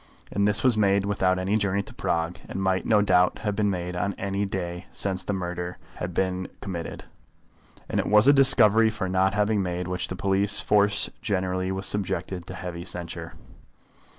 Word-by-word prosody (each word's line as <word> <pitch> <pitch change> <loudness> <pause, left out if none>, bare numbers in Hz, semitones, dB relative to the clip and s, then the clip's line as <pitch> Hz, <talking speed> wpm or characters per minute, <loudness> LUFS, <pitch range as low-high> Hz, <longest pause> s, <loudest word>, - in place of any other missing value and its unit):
And 100 +1 +1
this 105 0 +2
was 125 -4 +3
made 100 -1 +2
without 95 -2 +1
any 95 +3 0
journey 100 -1 0
to - - -12
Prague, 85 +1 -2
and 95 - -4
might, 95 -1 0
no 105 -2 +4
doubt, 90 -2 +3
have 105 -2 -1
been 105 -1 +1
made 90 -2 -3
on 95 +3 -2
any 100 +1 -2
day 90 -1 -5
since 95 -2 -2
the - - -3
murder 90 -2 -4 0.2
had 90 - -4
been 95 +1 -1
committed. 85 -4 -6 0.8
And - - -1
it - - -1
was 105 +3 +5
a 140 - +8
discovery 115 -5 +6
for 105 -3 -4
not 95 +1 +1
having 105 0 +1
made 90 -1 -3
which 90 0 -2
the 95 - -5
police 100 +2 +3
force 105 -1 +2
generally 95 -1 -1
was 95 0 -3
subjected 95 -3 -2
to 95 - -7
heavy 90 -2 -6
censure. 90 -2 -6
95 Hz, 185 wpm, -25 LUFS, 90-100 Hz, 0.8 s, a